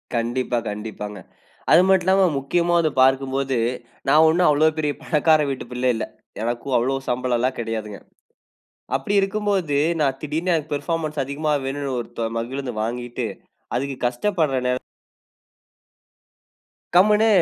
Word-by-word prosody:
கண்டிப்பா, 120 +1 -1
கண்டிப்பாங்க. 105 -1 -6 0.5
அது 175 - +8
மட்டும் 190 -2 +4
இல்லாம, 190 0 +5
முக்கியமா 170 +5 0
வந்து 160 -3 +1
பார்க்கும்போது 135 0 +2 0.5
நான் 155 +3 +6
ஒன்னும் 175 +1 +3
அவ்வளவு 155 +2 +3
பெரிய 150 -2 0
பணக்கார 155 0 +3
வீட்டு 135 - -4
பிள்ளை 125 +1 +1
இல்ல. 110 - -2 0.4
எனக்கும் 120 +3 -1
அவ்வளவு 135 +3 -1
சம்பளம் 125 0 0
எல்லா 130 +2 +2
கிடையாதுங்க. 110 -3 -4 1.0
அப்படி 135 +9 -2
இருக்கும்போது 195 -6 0 0.3
நான் 135 -2 +1
திடீர்ன்னு 160 +4 -1
எனக்கு 155 -2 -1
பர்ஃபார்மன்ஸ் 155 -1 -2
அதிகமா 145 +3 -2
வேணும்ன்னு 135 -1 -3
ஒரு - - -10
தொ 115 - 0
மகிழுந்து 130 +3 -3
வாங்கிட்டு 120 +1 -3 0.5
அதுக்கு 135 +2 -2
கஷ்டப்படுற 150 +1 0
நேர 125 - +1 2.2
கம்னு 210 +4 +5
140 Hz, 125 wpm, -22 LUFS, 125-160 Hz, 2.2 s, அது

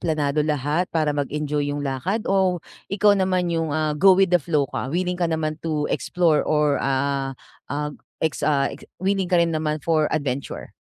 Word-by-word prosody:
planado 150 -3 0
lahat 150 +3 0
para 155 -3 0
mag-enjoy 145 0 -1
yung 145 - -3
lakad? 175 - -2
O, 190 -3 +2 0.3
ikaw 205 0 +5
naman 185 -2 +1
yung, 165 -3 -1
ah, 155 -1 0
go 190 +3 +7
with 195 -1 +4
the - - +8
flow 150 -2 +1
ka, 130 - -3
willing 180 0 0
ka - - +3
naman 155 -1 -1
to 155 -2 -1
explore 170 -4 +2
or 150 -2 +3
ah 135 0 0 0.4
ah, 150 +1 -1 0.4
ex 160 - -1
ah, 140 -2 +2
ik - - -11 0.2
willing 195 -2 +1
ka 180 - +3
rin 170 -1 +2
naman 155 -1 -1
for 155 -2 +2
adventure? 140 -3 -3
155 Hz, 180 wpm, -23 LUFS, 145-175 Hz, 0.4 s, the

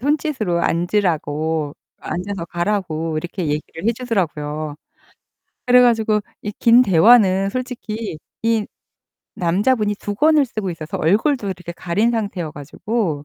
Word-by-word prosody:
손짓으로 260 - 0
앉으라고 160 -4 0 0.2
앉아서 185 -1 -4
가라고 175 -3 -2
이렇게 175 +3 -5
얘기를 150 +3 -4
해 230 - +4
주더라고요. 155 - -3 0.9
그래 250 0 +6
가지고 225 -3 +3 0.2
이 210 - -4
긴 235 +1 +6
대화는 195 -1 +5
솔직히 230 - -5 0.2
이 225 -2 +1 0.7
남자분이 205 +5 +1
두건을 290 +9 +2
쓰고 215 -5 -4
있어서 160 -2 -6
얼굴도 220 - +2
이렇게 180 -2 -6
가린 195 +7 0
상태여 200 -8 -3
가지고. 155 - -3
200 Hz, 300 characters per minute, -20 LUFS, 165-230 Hz, 0.9 s, 그래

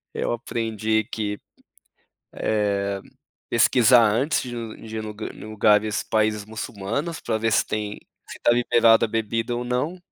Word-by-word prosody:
Eu - - -1
aprendi 110 -2 -1
que, 105 -2 -4 1.0
eh, 100 -2 -1 0.5
pesquisar 125 0 +5
antes 135 +9 +1
de 120 -1 -6
ir 115 -1 -7
de 110 - -7
ir 110 - -4 0.3
em - - -11
lugares, 105 0 +2
países 110 -1 0
muçulmanos 110 - -4
pra 110 -2 -1
ver 115 0 0
se - - +3
tem 105 -1 -4 0.3
se - - -9
está - - +3
liberado 115 -1 +4
a - - -14
bebida 115 +2 -1
ou 120 - -3
não. 125 +9 -2
110 Hz, 150 wpm, -24 LUFS, 105-120 Hz, 1.0 s, pesquisar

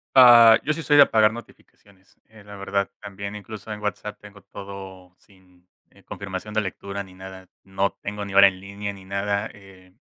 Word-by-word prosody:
Ah, 120 -3 +9
yo 155 - -1
sí 165 - -6
soy 145 0 +3
de 145 - +10
apagar 110 -3 +3
notificaciones, 100 -4 -16
eh, 110 -2 -18
la 100 0 -11
verdad, 100 0 -2
también 100 0 -8
incluso 105 0 -9
en 105 - -7
WhatsApp 105 0 -5
tengo 100 -1 -15
todo 95 -2 -11
sin, 90 -2 -26 0.2
eh, - - -23
confirmación 100 +1 -7
de 110 - +1
lectura 100 0 -6
ni 95 -1 -16
nada, 95 0 -12 0.2
no 95 +1 -1
tengo 105 0 -5
ni 100 - -8
hora 100 0 +8
en 95 -1 -8
línea 100 +1 -6
ni 95 -1 -14
nada, 100 +1 -2
eh, 95 -2 -18
100 Hz, 190 wpm, -23 LUFS, 95-105 Hz, 0.2 s, de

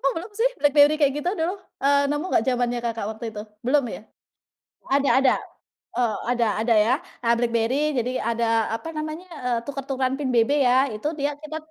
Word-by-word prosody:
Belum 370 +6 -6
sih, - - +3
BlackBerry 290 +1 +5
kayak 275 -1 +4
gitu 355 - +1
dulu, 365 +1 -2 0.2
eee, 280 +1 +4
nemu 295 +3 -1
gak 225 - +2
zamannya 245 -1 0
Kakak 230 -3 -2
waktu 220 +1 -7
itu? 210 - -5 0.2
Belum 280 +2 +3
ya? 215 - -8 0.9
Ada 275 0 +2
ada? 265 - +4 0.6
Eee, 230 -4 0
ada 235 -2 +2 0.2
ada 230 0 +3
ya. 225 +5 +4 0.3
Nah 235 - +3
Blackberry, 240 +5 +1
jadi 250 -2 -1
ada 230 -1 +1
apa 315 +8 -5
namanya, 310 +4 -5
eee, 250 -8 -2
tuker-tukeran 270 -1 -2
PIN 270 -3 -2
BB 230 +2 +3
ya. 250 +1 +4
Itu 215 +8 -3
dia 285 +1 -1
kita 305 +1 -7
265 Hz, 180 wpm, -24 LUFS, 235-295 Hz, 0.9 s, BlackBerry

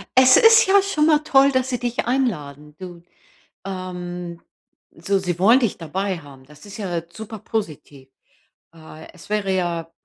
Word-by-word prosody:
Es 260 0 +7
ist 455 0 +6
ja 395 0 +5
schon 310 -6 0
mal 305 -2 +4
toll, 275 -2 +4
dass 260 0 -1
sie 245 -3 -3
dich 240 -1 -3
einladen, 150 - -3
du, 175 -2 -11 0.6
ähm 180 -2 -7 0.6
so, 195 +4 -1
sie 180 -2 -4
wollen 225 +8 +5
dich 230 -7 -1
dabei 185 +3 -3
haben. 140 -3 -15
Das 150 +6 -17
ist 200 - -10
ja 175 -5 -3
super 220 +3 -9
positiv. 150 - -6 0.7
Äh, 155 0 -13
es 180 - -16
wäre 210 -2 -1
ja 170 -2 -3
185 Hz, 160 wpm, -21 LUFS, 165-245 Hz, 0.7 s, Es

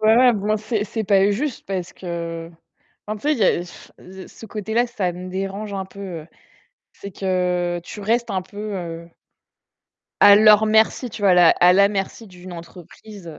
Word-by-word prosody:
Ouais 220 +1 +4
ouais, 250 0 +6
bon 205 -2 -4
là, 215 0 +2
c'est 215 0 -2
c'est 220 +1 -4
pas 195 0 +3
juste 255 +6 -3
parce 185 -2 -4
que, 170 -2 -6 0.6
en 215 0 -4
fait, 295 +7 0
il 290 - -2
y 210 - +3
a 175 - +1
ce 185 +1 -14
ce 225 - -13
côté-là, 220 +3 -1
ça 200 -7 -3
me 180 +1 -8
dérange 195 +2 -5
un 190 -1 -3
peu, 200 +1 -14 0.2
heu, - - -17 0.7
c'est 200 - -10
que 180 -2 -1
tu 205 - -10
restes 235 +4 0
un 190 - -1
peu, 205 +3 -7
heu 170 -2 -7 1.1
à 200 - +9
leur 215 0 +6
merci, 220 +3 +2
tu 205 - -9
vois? 195 - +4
À - - +5
la 175 -2 +6
à 180 +1 +4
la 200 +2 +5
merci 200 +2 -4
d'une 180 -1 -12
entreprise, 175 +3 -12
heu 160 - -10
195 Hz, 195 wpm, -21 LUFS, 180-215 Hz, 1.1 s, à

